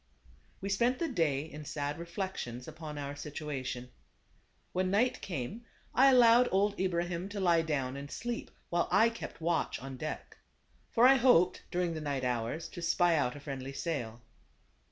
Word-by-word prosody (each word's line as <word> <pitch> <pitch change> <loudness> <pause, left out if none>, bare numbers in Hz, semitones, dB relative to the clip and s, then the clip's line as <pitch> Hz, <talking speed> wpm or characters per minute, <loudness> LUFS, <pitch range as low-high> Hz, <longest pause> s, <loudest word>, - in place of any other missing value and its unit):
We 195 - -3
spent 235 +6 +2
the 335 - -1
day 150 - +1
in 150 -1 -9
sad 145 +1 -3
reflections 170 - -5
upon 155 -1 -7
our 140 0 -4
situation. 140 -4 -5 0.8
When 185 0 +1
night 220 +6 +2
came 135 -8 -4
on, 230 - -10 0.4
I - - +8
allowed 245 -1 +6
old 200 +2 +2
Ibrahim 175 0 -1
to 205 0 -5
lie 170 -3 +4
down 135 -5 -1
and 140 +1 -7
sleep, 240 +6 -4 0.2
while 170 0 +2
I 230 - +5
kept 230 - -8
watch 170 0 0
on 135 0 -7
deck. 155 +3 -6 0.5
For 235 +1 +4
I 270 +1 +7
hoped 240 -9 +4
during 175 -1 0
the 155 - -4
night 140 -3 -2
hours 125 +6 -1
to 175 - -8
spy 170 0 +3
out 140 -4 +1
a - - -8
friendly 135 -2 -6
sail. 120 -8 -4
165 Hz, 170 wpm, -32 LUFS, 140-190 Hz, 0.8 s, I